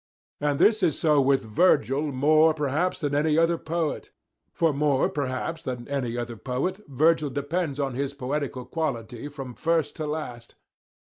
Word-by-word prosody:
And 145 Hz, -1 st, 0 dB
this 215 Hz, +5 st, +4 dB
is 170 Hz, -6 st, +2 dB
so 150 Hz, -3 st, +3 dB
with 135 Hz, 0 st, +2 dB
Virgil 135 Hz, -, +2 dB
more, 155 Hz, +4 st, +4 dB
perhaps, 155 Hz, +5 st, 0 dB
than 145 Hz, -3 st, -1 dB
with 145 Hz, +1 st, +2 dB
any 155 Hz, -1 st, +2 dB
other 165 Hz, 0 st, +3 dB
poet; 165 Hz, -1 st, -2 dB, 0.4 s
for 165 Hz, -2 st, +1 dB
more, 140 Hz, -1 st, +2 dB
perhaps, 145 Hz, +3 st, -3 dB
than 125 Hz, -2 st, -5 dB
any 130 Hz, -4 st, -2 dB
other 120 Hz, -1 st, -4 dB
poet 135 Hz, -, -2 dB
Virgil 155 Hz, +2 st, +2 dB
depends 145 Hz, +2 st, -2 dB
on 135 Hz, -2 st, -1 dB
his 140 Hz, +2 st, -3 dB
poetical 135 Hz, -1 st, -3 dB
quality 130 Hz, -6 st, -3 dB
from 135 Hz, -4 st, -8 dB
first 160 Hz, +1 st, 0 dB
to 155 Hz, -, -3 dB
last. 125 Hz, -6 st, -6 dB
145 Hz, 160 wpm, -26 LUFS, 130-160 Hz, 0.4 s, this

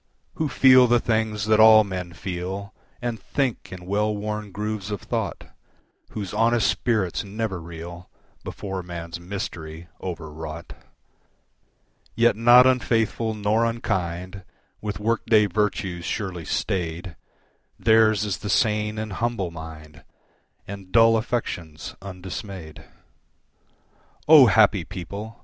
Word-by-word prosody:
Who 155 Hz, -2 st, -2 dB
feel 130 Hz, -2 st, +6 dB
the 120 Hz, 0 st, +4 dB
things 110 Hz, -2 st, -1 dB
that 110 Hz, 0 st, +3 dB
all 110 Hz, 0 st, +8 dB
men 90 Hz, -3 st, -5 dB
feel, 95 Hz, +3 st, -5 dB, 0.3 s
And 120 Hz, -2 st, -2 dB
think 135 Hz, -5 st, -2 dB
in 90 Hz, -1 st, -9 dB
well 105 Hz, +3 st, 0 dB
worn 105 Hz, 0 st, -4 dB
grooves 105 Hz, 0 st, -4 dB
of 105 Hz, -2 st, -4 dB
thought, -, -, -4 dB, 0.6 s
Whose 100 Hz, -4 st, -6 dB
honest 115 Hz, -2 st, +2 dB
spirits 105 Hz, -7 st, 0 dB
never 100 Hz, -2 st, -4 dB
reel 85 Hz, +2 st, -9 dB, 0.3 s
Before 95 Hz, -2 st, -5 dB
man's 85 Hz, -1 st, -7 dB
mystery, 85 Hz, -3 st, -7 dB
overwrought. 80 Hz, -2 st, -7 dB, 1.4 s
Yet 120 Hz, -2 st, +4 dB
not 120 Hz, +3 st, +7 dB
unfaithful 115 Hz, -3 st, +1 dB
nor 105 Hz, +2 st, +1 dB
unkind, 95 Hz, -5 st, -3 dB, 0.4 s
with 105 Hz, -1 st, -4 dB
work 115 Hz, +2 st, 0 dB
day 110 Hz, -2 st, +5 dB
virtues 95 Hz, -3 st, -1 dB
surely 90 Hz, -6 st, -4 dB
staid, 85 Hz, -2 st, -3 dB, 0.6 s
Theirs 110 Hz, -1 st, +4 dB
is 100 Hz, -5 st, -3 dB
the 105 Hz, -, -5 dB
sane 105 Hz, 0 st, +1 dB
and 110 Hz, -2 st, -4 dB
humble 115 Hz, -5 st, -2 dB
mind, 80 Hz, -2 st, -10 dB, 0.6 s
And 100 Hz, -2 st, -9 dB
dull 115 Hz, 0 st, +6 dB
affections 90 Hz, -9 st, -3 dB
undismayed. 95 Hz, -3 st, -8 dB, 1.4 s
O 150 Hz, -4 st, +9 dB
happy 105 Hz, -3 st, +4 dB
people! 100 Hz, +6 st, -8 dB
100 Hz, 120 wpm, -24 LUFS, 90-110 Hz, 1.4 s, O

